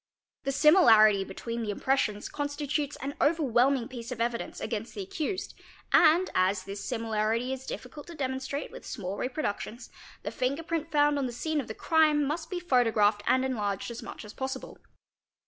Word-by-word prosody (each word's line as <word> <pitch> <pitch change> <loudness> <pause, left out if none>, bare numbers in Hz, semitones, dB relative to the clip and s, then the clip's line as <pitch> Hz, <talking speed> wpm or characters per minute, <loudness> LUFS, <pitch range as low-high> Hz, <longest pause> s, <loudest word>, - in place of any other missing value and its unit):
The 275 - +1
similarity 225 - +6
between 230 +4 -5
the 220 - -3
impressions 210 -2 0
constitutes 290 0 -2
an 275 +1 -3
overwhelming 270 -4 +3
piece 245 -2 -8
of 245 - -5
evidence 235 0 -2
against 220 +1 -4
the 400 - -4
accused 375 -1 -4 0.4
and, 340 +4 +6
as 185 +1 +2
this 200 +1 -7
simila 225 -3 -1
rity 235 +3 0
is 265 0 -8
difficult 290 +4 -7
to 340 - -9
demonstrate 265 0 -3
with - - -10
small 195 -4 -5
reproductions, 250 -2 -4 0.3
the - - -3
finger 275 +4 -1
print 330 -1 -3
found 295 -1 +3
on 270 - 0
the - - -5
scene 305 +5 -1
of 255 - -10
the 220 - -6
crime 305 -2 +3
must 320 +3 -3
be 365 - -3
photographed 225 -9 +3
and 260 0 +3
enlarged 210 -4 -2
as 235 - -7
much - - -8
as 210 - -10
possible. 265 0 -5
260 Hz, 175 wpm, -29 LUFS, 225-295 Hz, 0.4 s, similarity